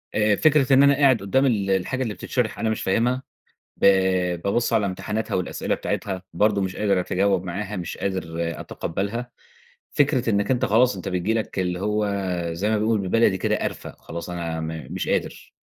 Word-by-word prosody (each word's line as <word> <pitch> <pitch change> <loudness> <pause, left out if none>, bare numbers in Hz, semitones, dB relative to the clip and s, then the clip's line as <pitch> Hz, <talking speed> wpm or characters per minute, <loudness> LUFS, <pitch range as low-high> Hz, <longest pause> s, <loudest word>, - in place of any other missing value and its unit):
آآ، 105 -1 +3
فكرة 140 0 +3
إن 135 +1 +7
أنا 140 0 +6
قاعد 135 -5 +4
قدام 130 +8 +2
ال 105 -7 +1
الحاجة 95 +8 0
اللي 110 -4 -3
بتتشرح 110 +4 -2
أنا 110 - 0
مش 110 - -2
فاهمها، 120 +7 +1 0.5
ب - - +1 0.6
بابُص 115 +4 0
على 110 -2 +3
امتحاناتها 105 +3 -3
والأسئلة 90 - -1
بتاعتها، 95 -2 -3
برضه 105 -1 +2
مش 95 -1 -2
قادر 100 -3 +1
أتجاوب 95 +1 +1
معاها، 100 +3 -4
مش 85 -1 -5
قادر 95 -1 -2 0.4
أتقبَّلها. 105 +8 -4 0.6
فكرة 135 -5 +2
إنَّك 100 +1 +1
أنتَ 125 -2 +2
خلاص 120 +3 +3
أنتَ 90 - -5
بتيجي 90 +4 0
لك- 110 -3 -3
اللي 90 -1 -1
هو 105 +1 0 0.4
زي 95 +6 -1
ما 110 - +2
بيقولوا 110 -1 +1
بالبلدي 95 0 +2
كده- - - +1
قرَفة، - - -4
خلاص 85 +2 -7
أنا 85 -2 -3
م 80 -3 -5
مش - - -3
قادر، - - -2
105 Hz, 180 wpm, -23 LUFS, 95-115 Hz, 0.6 s, إن